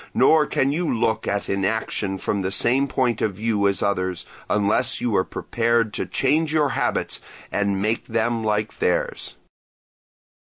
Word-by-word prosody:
Nor 155 Hz, -2 st, +5 dB
can 135 Hz, +1 st, +1 dB
you 170 Hz, +3 st, -1 dB
look 110 Hz, -1 st, 0 dB
at 100 Hz, 0 st, -1 dB
inaction 100 Hz, 0 st, -1 dB
from 100 Hz, +1 st, -2 dB
the 95 Hz, 0 st, -2 dB
same 130 Hz, +7 st, +2 dB
point 125 Hz, -5 st, 0 dB
of 105 Hz, -3 st, 0 dB
view 105 Hz, -1 st, +1 dB
as 100 Hz, -, 0 dB
others, 95 Hz, -3 st, -1 dB, 0.2 s
unless 105 Hz, +5 st, +1 dB
you 120 Hz, -4 st, 0 dB
are 95 Hz, -, +3 dB
prepared 115 Hz, +1 st, 0 dB
to -, -, -3 dB
change 150 Hz, +3 st, +1 dB
your 150 Hz, -2 st, +2 dB
habits 135 Hz, -2 st, -1 dB, 0.3 s
and 100 Hz, -1 st, 0 dB
make 110 Hz, +3 st, -1 dB
them 115 Hz, 0 st, 0 dB
like 105 Hz, 0 st, -1 dB
theirs. -, -, -1 dB
110 Hz, 155 wpm, -23 LUFS, 100-125 Hz, 0.3 s, Nor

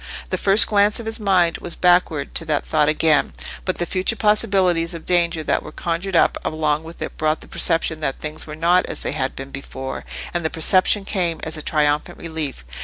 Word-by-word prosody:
The -, -, 0 dB
first 200 Hz, +2 st, +4 dB
glance 205 Hz, +1 st, +2 dB
of 230 Hz, -, -7 dB
his 225 Hz, +1 st, -2 dB
mind 185 Hz, -5 st, +2 dB
was 175 Hz, -, -5 dB
backward 175 Hz, -5 st, +2 dB
to 165 Hz, -, -1 dB
that 150 Hz, -2 st, -1 dB
thought 150 Hz, -1 st, +2 dB
again, 155 Hz, -1 st, +2 dB, 0.3 s
but 185 Hz, -, -1 dB
the 175 Hz, -, -1 dB
future 185 Hz, +5 st, -1 dB
possibilities 195 Hz, -6 st, +1 dB
of 165 Hz, -, -9 dB
danger 170 Hz, -2 st, +1 dB
that -, -, 0 dB
were 155 Hz, -, -10 dB
conjured 175 Hz, +4 st, -3 dB
up -, -, +3 dB
along 155 Hz, -1 st, -1 dB
with 165 Hz, +1 st, -11 dB
it -, -, -7 dB
brought 155 Hz, 0 st, 0 dB
the -, -, -11 dB
perception 165 Hz, -2 st, +2 dB
that 135 Hz, -3 st, -2 dB
things 155 Hz, +1 st, -4 dB
were 150 Hz, -, -7 dB
not 175 Hz, +3 st, +2 dB
as -, -, -4 dB
they -, -, -1 dB
had 130 Hz, 0 st, -2 dB
been 135 Hz, +1 st, -8 dB
before, 135 Hz, -1 st, -6 dB, 0.3 s
and 175 Hz, -1 st, -1 dB
the 160 Hz, -, 0 dB
perception 185 Hz, +4 st, +3 dB
came 175 Hz, -5 st, -1 dB
as 160 Hz, 0 st, -4 dB
a 155 Hz, -, -6 dB
triumphant 150 Hz, -1 st, 0 dB
relief. 155 Hz, -, -4 dB
165 Hz, 210 wpm, -21 LUFS, 155-185 Hz, 0.3 s, first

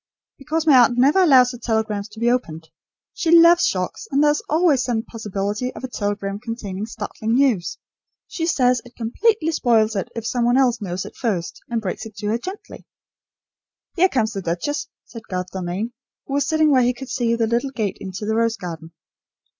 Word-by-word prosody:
"Because 310 Hz, +3 st, -2 dB
my 280 Hz, -5 st, +7 dB
aunt 240 Hz, 0 st, +4 dB
never 280 Hz, +9 st, +4 dB
allows 260 Hz, -8 st, +6 dB
her 245 Hz, -, -9 dB
telegrams 220 Hz, -3 st, -1 dB
to 215 Hz, +1 st, -12 dB
be 235 Hz, +1 st, +2 dB
opened. 160 Hz, -10 st, -3 dB, 0.4 s
She 345 Hz, -, -2 dB
loves 340 Hz, +1 st, +7 dB
shocks; 185 Hz, -1 st, -3 dB
and 280 Hz, +2 st, +2 dB
there 295 Hz, -, +5 dB
is 300 Hz, -, -1 dB
always 310 Hz, -4 st, +3 dB
the 230 Hz, -3 st, -1 dB
possibility 210 Hz, +2 st, -3 dB
of -, -, -9 dB
a -, -, -2 dB
telegram 205 Hz, -3 st, -3 dB
containing 215 Hz, -3 st, -5 dB
startling 220 Hz, 0 st, -3 dB
news. 235 Hz, -11 st, +1 dB, 0.5 s
She 330 Hz, -1 st, -3 dB
says 250 Hz, -6 st, +2 dB
it 245 Hz, 0 st, -16 dB
completely 325 Hz, -, +1 dB
spoils 225 Hz, -7 st, +2 dB
it 195 Hz, -, -2 dB
if 230 Hz, -1 st, -5 dB
some 245 Hz, +1 st, 0 dB
one 240 Hz, +2 st, +3 dB
else 245 Hz, -4 st, +2 dB
knows 185 Hz, -2 st, -4 dB
it -, -, -10 dB
first, 195 Hz, -9 st, -3 dB
and 230 Hz, -2 st, -2 dB
breaks 215 Hz, +3 st, -4 dB
it 215 Hz, -, -15 dB
to 210 Hz, 0 st, -7 dB
her 225 Hz, +2 st, 0 dB
gently." 375 Hz, -, -9 dB, 1.1 s
"Here 370 Hz, +2 st, +4 dB
comes 225 Hz, -7 st, 0 dB
the 195 Hz, -, -4 dB
duchess," 285 Hz, -, -2 dB, 0.2 s
said 230 Hz, -2 st, -11 dB
Garth 180 Hz, -1 st, -4 dB
Dalmain, 190 Hz, +5 st, -4 dB, 0.3 s
who 275 Hz, -, -6 dB
was 285 Hz, 0 st, +1 dB
sitting 315 Hz, -1 st, +3 dB
where 260 Hz, -2 st, +5 dB
he 245 Hz, 0 st, +1 dB
could 265 Hz, +1 st, -9 dB
see 235 Hz, -2 st, +1 dB
the 230 Hz, -1 st, +1 dB
little 235 Hz, +4 st, 0 dB
gate 220 Hz, -7 st, -3 dB
into 190 Hz, +2 st, -6 dB
the 220 Hz, -, 0 dB
rose 230 Hz, 0 st, +1 dB
garden. 165 Hz, -3 st, -8 dB
235 Hz, 200 wpm, -21 LUFS, 205-270 Hz, 1.1 s, my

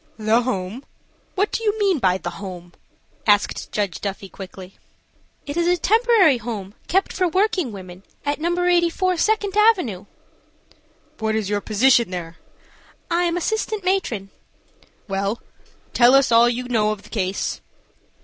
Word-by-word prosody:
"The 220 Hz, +2 st, +2 dB
home! 215 Hz, 0 st, -3 dB, 0.5 s
What 405 Hz, +2 st, +1 dB
do 455 Hz, -, -2 dB
you 425 Hz, 0 st, +1 dB
mean 395 Hz, -6 st, +2 dB
by 185 Hz, -5 st, +2 dB
the -, -, -5 dB
home?" 180 Hz, -3 st, -9 dB, 0.5 s
asked 205 Hz, -1 st, +2 dB
Judge 200 Hz, -5 st, -2 dB
Duffy, 195 Hz, -1 st, -5 dB
quickly. 190 Hz, -1 st, -11 dB, 0.7 s
"It 285 Hz, -, -5 dB
is 340 Hz, 0 st, +2 dB
a 355 Hz, 0 st, +3 dB
temporary 430 Hz, -, +4 dB
home 210 Hz, -4 st, -6 dB
kept 385 Hz, +3 st, +1 dB
for 365 Hz, -1 st, +1 dB
working 370 Hz, -, +1 dB
women 185 Hz, -2 st, -10 dB, 0.2 s
at 290 Hz, +1 st, -1 dB
No. 345 Hz, +2 st, 0 dB
84 355 Hz, +1 st, +2 dB
Second 410 Hz, +1 st, +1 dB
Avenue." 365 Hz, -, +2 dB, 1.1 s
"What 220 Hz, 0 st, 0 dB
is 210 Hz, -2 st, -2 dB
your 205 Hz, 0 st, 0 dB
position 235 Hz, +1 st, +3 dB
there?" 170 Hz, -3 st, -6 dB, 0.7 s
"I 345 Hz, +1 st, +2 dB
am 345 Hz, 0 st, 0 dB
assistant 435 Hz, +2 st, -2 dB
matron." 250 Hz, -, -1 dB, 0.8 s
"Well, 195 Hz, +3 st, -2 dB, 0.5 s
tell 245 Hz, +2 st, +6 dB
us 275 Hz, -2 st, +4 dB
all 230 Hz, +1 st, +6 dB
you 245 Hz, +1 st, -2 dB
know 220 Hz, -4 st, +1 dB
of 210 Hz, -1 st, -6 dB
the -, -, -15 dB
case." 190 Hz, -3 st, -2 dB
240 Hz, 150 wpm, -22 LUFS, -, 1.1 s, tell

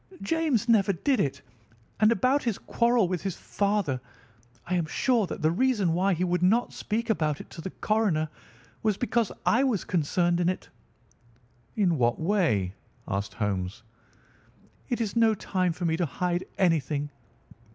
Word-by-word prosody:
James 315 Hz, -9 st, +1 dB
never 205 Hz, -4 st, +4 dB
did 260 Hz, -, +1 dB
it. 140 Hz, -7 st, -1 dB, 0.6 s
And 215 Hz, +1 st, +5 dB
about 255 Hz, +6 st, +2 dB
his 230 Hz, -5 st, -1 dB
quarrel 235 Hz, -4 st, +2 dB
with 180 Hz, -1 st, -2 dB
his 195 Hz, -3 st, -3 dB
father, 200 Hz, -11 st, -1 dB, 0.6 s
I 180 Hz, -, -3 dB
am 175 Hz, -3 st, +1 dB
sure 230 Hz, +3 st, +1 dB
that -, -, -6 dB
the 155 Hz, -, +4 dB
reason 205 Hz, -4 st, +2 dB
why 185 Hz, +2 st, +2 dB
he 175 Hz, -, -1 dB
would 180 Hz, -1 st, 0 dB
not 215 Hz, +7 st, +2 dB
speak 230 Hz, +2 st, -2 dB
about 155 Hz, -7 st, 0 dB
it -, -, -11 dB
to 165 Hz, -, -8 dB
the 190 Hz, -, -5 dB
coroner 200 Hz, -8 st, 0 dB, 0.5 s
was 215 Hz, -3 st, +1 dB
because 235 Hz, -3 st, 0 dB
I 235 Hz, +4 st, +4 dB
was 245 Hz, -8 st, +1 dB
concerned 175 Hz, +1 st, +1 dB
in 175 Hz, 0 st, +2 dB
it." 185 Hz, -, -4 dB, 1.1 s
"In 180 Hz, -, +2 dB
what 120 Hz, -1 st, +2 dB
way?" 160 Hz, -, +1 dB, 0.3 s
asked 100 Hz, +1 st, -3 dB
Holmes. 100 Hz, 0 st, -2 dB, 1.1 s
"It 240 Hz, -1 st, -1 dB
is 220 Hz, -1 st, -2 dB
no 225 Hz, -1 st, +4 dB
time 185 Hz, -3 st, -1 dB
for 175 Hz, +2 st, -4 dB
me 160 Hz, -1 st, +1 dB
to 175 Hz, -2 st, 0 dB
hide 175 Hz, +5 st, -2 dB
anything. 150 Hz, -5 st, +1 dB
185 Hz, 160 wpm, -27 LUFS, 160-220 Hz, 1.1 s, And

